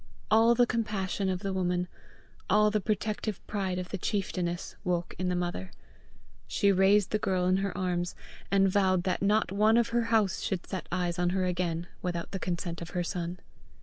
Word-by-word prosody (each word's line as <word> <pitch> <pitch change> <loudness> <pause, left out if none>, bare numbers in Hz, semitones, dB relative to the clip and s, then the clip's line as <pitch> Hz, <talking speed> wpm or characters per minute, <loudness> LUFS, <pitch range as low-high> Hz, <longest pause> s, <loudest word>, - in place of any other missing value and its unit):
All 225 +2 +6
the 245 +1 +5
compassion 210 -5 -1
of 185 -1 -2
the 195 -2 -2
woman, 180 -1 0 0.6
all 210 +2 +5
the 210 0 +1
protective 215 0 -2
pride 190 -3 -2
of 180 -1 -4
the 200 - -4
chieftainess, 180 -4 -2
woke 175 -1 -1
in 185 0 0
the 180 - 0
mother. 175 - -3 0.8
She 200 - +3
raised 195 +1 +4
the 215 - +1
girl 185 -3 0
in 185 +1 +3
her 195 -1 -2
arms, 180 -2 -1 0.3
and 195 0 +4
vowed 185 -2 +2
that 185 -1 -1
not 205 0 +2
one 215 +3 +4
of 235 -1 +3
her 235 0 +1
house 220 -4 +2
should 185 -3 -2
set 185 - -5
eyes 175 0 -1
on 175 0 +2
her 185 0 0
again 175 -2 -1 0.2
without 175 -2 -3
the 195 - -3
consent 170 -1 -3
of 170 - -6
her 175 - +1
son. 175 0 -3
185 Hz, 190 wpm, -29 LUFS, 180-205 Hz, 0.8 s, All